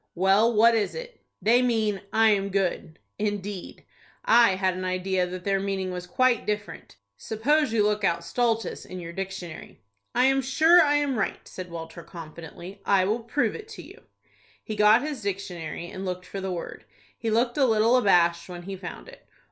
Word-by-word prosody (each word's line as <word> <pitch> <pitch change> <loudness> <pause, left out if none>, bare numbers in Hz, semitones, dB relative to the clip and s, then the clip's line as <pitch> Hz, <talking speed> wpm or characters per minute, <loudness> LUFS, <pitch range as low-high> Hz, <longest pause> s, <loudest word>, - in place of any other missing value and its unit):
"Well, 195 +6 +4
what 230 +1 +5
is 220 -2 0
it?" - - -9 0.2
"They 235 +4 +5
mean, 220 -5 0
'I 225 0 +4
am 200 -1 +1
good.'" 185 -4 -2 0.2
"Indeed,—I 205 +2 0
had 190 -1 +1
an 185 - -5
idea 185 0 0
that 180 0 -7
their 195 0 +1
meaning 195 -1 -2
was 180 -1 -6
quite 245 +5 +1
different. 210 - -4 0.2
Suppose 285 +6 +1
you 220 -2 +2
look 210 0 0
out 170 -3 +1
stultus 225 +4 -1
in 185 - -8
your 170 -1 -7
dictionary." 190 -3 -7 0.4
"I 255 - +4
am 270 0 +3
sure 320 +7 +5
I 290 -2 +3
am 285 -5 0
right," 195 - -3
said 185 -1 -8
Walter, 165 0 -8
confidently. 170 +3 -10
"I 195 -2 +3
will 215 +5 0
prove 235 +5 -1
it 430 -1 -9
to - - -8
you." - - -14 0.6
He 215 - -5
got 210 +4 +5
his 295 -5 -4
dictionary, 180 -4 -5
and 190 - -7
looked 180 -1 -4
for 195 - -6
the 190 0 -3
word. 175 -2 -6 0.3
He 230 - -3
looked 240 +4 +1
a 270 - +5
little 225 +1 +3
abashed 175 -7 +3
when 175 -1 -8
he 195 +2 -6
found 120 - -9
it. - - -15
200 Hz, 185 wpm, -26 LUFS, 185-230 Hz, 0.6 s, what